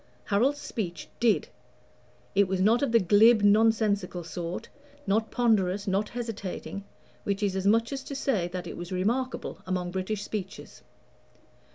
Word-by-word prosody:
Harold's 245 +8 +2
speech 175 - -5
"did": 230 -4 +2 0.8
it 200 0 +4
was 190 0 -1
not 220 +5 +4
of 280 -4 +1
the 230 - +6
glib 210 +3 +5
nonsensical 205 -4 +3
sort, 170 +1 -5 0.4
not 220 +3 +1
ponderous, 205 -5 +1
not 200 +2 0
hesitating 210 -4 -5 0.4
which 200 +1 -1
is 195 -2 0
as 190 +1 0
much 230 +5 +3
as 270 - -4
to 280 - -7
say, 220 -10 0
that 180 0 -5
it 170 - -7
was 175 +1 -7
remarkable 235 +8 -1
among 180 -1 -2
British 190 +3 -3
speeches. 195 -3 -6
205 Hz, 150 wpm, -28 LUFS, 185-225 Hz, 0.8 s, the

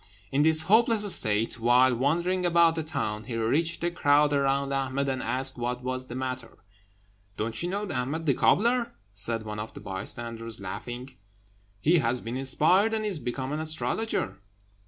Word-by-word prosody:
In 140 - +2
this 160 +1 +4
hopeless 215 0 +4
state, 110 -2 0
while 125 +2 +4
wandering 170 +8 0
about 170 -1 +4
the 165 - -2
town, 120 -9 -3
he 120 - -5
reached 150 +10 0
the 175 +1 0
crowd 145 -2 +3
around 140 0 +1
Ahmed 135 0 -1
and 130 -1 -1
asked 130 0 -1
what 125 +1 -3
was 130 0 -3
the 120 - -7
matter. 130 -2 -5 0.8
"Don't 110 +1 -2
you 175 - -2
know 205 +2 -3
Ahmed 145 +3 -3
the 140 - +3
cobbler?" 235 - +2 0.2
said 110 +3 -2
one 105 -1 -6
of 110 +1 -7
the - - -7
bystanders, 115 +3 -1
laughing; 120 +7 -6 0.7
"he 165 - +3
has 120 -1 0
been 115 +1 -6
inspired, 170 +11 +2
and 215 -1 -2
is 195 -7 -3
become 130 +1 -4
an 150 - -2
astrologer." 155 - -2
135 Hz, 170 wpm, -27 LUFS, 120-165 Hz, 0.8 s, this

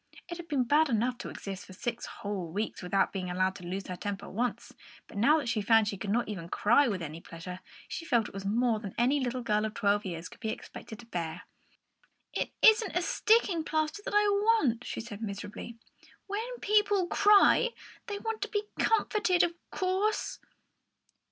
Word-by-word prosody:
It 345 -1 -6
had 345 -1 -9
been 280 -5 +1
bad 295 +5 +3
enough 240 +2 0
to - - -5
exist 195 -1 -6
for 185 - -11
six 235 +5 -4
whole 200 -4 -4
weeks 210 +5 -3
without 195 +2 +1
being 185 -2 -3
allowed 185 +1 +1
to - - -12
lose 190 +2 -4
her 180 - -5
temper 200 +1 -5
once, 240 +4 -3 0.3
but - - -14
now 235 +10 +5
that 285 -5 -3
she 225 -2 0
found 225 +1 +4
she 205 - -1
could 200 - -4
not 235 +4 +1
even 180 -5 -6
cry 240 +10 +4
with 195 -6 -2
any 160 +1 -7
pleasure, 175 +2 -8 0.3
she - - -5
felt 235 -9 +2
it - - -13
was 195 0 -6
more 225 +2 +1
than 200 -3 -7
any 260 +5 +3
little 250 -1 -2
girl 210 -2 +1
of 215 0 -3
twelve 205 0 +2
years 170 -3 -5
old - - -8
could - - -14
be 220 - -3
expected 220 0 -7
to 235 - -13
bear. 170 -4 -4 0.9
"It - - -2
isn't 440 -3 +6
sticking 410 -7 +3
plaster 310 +5 -1
that - - -3
I 415 - +6
want," 405 - +2
she - - -4
said 225 -2 -8
miserably. 210 +2 -6 0.5
"When 405 +2 -2 0.2
people 415 -2 +3
cry, 415 +6 +5 0.4
they 410 -2 -3
want 450 +1 -4
to - - -2
be 415 -1 -1 0.2
comforted, 415 -4 +3
of 345 - +1 0.2
course." 385 +3 -1
235 Hz, 195 wpm, -30 LUFS, -, 0.9 s, isn't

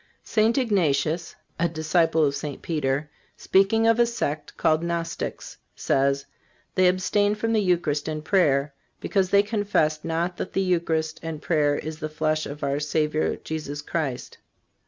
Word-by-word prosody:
St. 220 +3 +2
Ignatius, 170 - +1 0.2
a 170 +1 +2
disciple 160 0 +2
of 140 - +1
St. 145 -1 -6
Peter, 150 -2 -1 0.3
speaking 200 +4 +3
of 230 +1 +4
a 240 - +5
sect 155 -10 -3
called 155 0 +2
Gnostics, 170 -1 -4 0.2
says: 140 +1 +1 0.5
"They 185 -1 +4
abstain 205 +3 +2
from 225 +2 -1
the 215 - +3
Eucharist 170 -6 0
and 155 -1 -4
prayer, 145 -8 +2 0.3
because 190 -2 0
they 200 +1 +5
confess 205 -8 0
not 170 +2 -2
that - - -5
the 195 - +1
Eucharist 165 -3 0
and 160 -2 -5
prayer 150 -3 +1
is 155 +1 -6
the 155 - -4
flesh 155 0 -1
of 145 +1 -8
our 140 +1 0
Savior 150 +1 0
Jesus 145 -2 -5
Christ." 145 -6 -4
160 Hz, 155 wpm, -25 LUFS, 150-185 Hz, 0.5 s, a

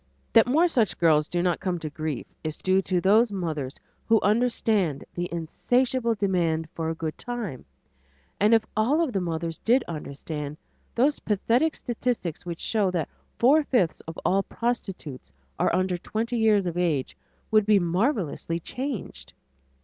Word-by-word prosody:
That - - +6
more 315 +8 +4
such 235 - +1
girls 155 -3 +4
do 175 0 -1
not 175 -2 +1
come 180 -2 -1
to 160 - -5
grief 155 -2 -4 0.2
is 155 -1 -3
due 190 0 +2
to 185 -1 0
those 210 +5 +4
mothers 155 -8 -3 0.3
who 225 -1 +5
understand 210 - +1
the 175 0 -3
insatiable 235 - 0
demand 170 -6 0
for 160 -1 -2
a 165 - -2
good 160 -1 -4
time, 225 - -5 0.7
and 215 +3 +5
if 225 - +2
all 265 +10 +3
of 280 -7 -2
the 195 - 0
mothers 165 -1 -3
did 245 +4 +3
understand, 150 -1 -6 0.4
those 275 +5 +2
pathetic 235 +9 +1
statistics 230 -9 -3
which 170 -1 -5
show 210 -4 +1
that 175 -4 -2 0.3
four 290 +6 +5
fifths 235 - +1
of 165 - -7
all 195 +2 +3
prostitutes 195 - -4 0.3
are - - +3
under 185 0 0
twenty 230 +6 -2
years 215 -3 +3
of 175 0 -2
age 155 -7 0 0.4
would 215 -1 +4
be 210 -1 +6
marvelously 175 - 0
changed. 255 - -6
190 Hz, 155 wpm, -26 LUFS, 165-230 Hz, 0.7 s, That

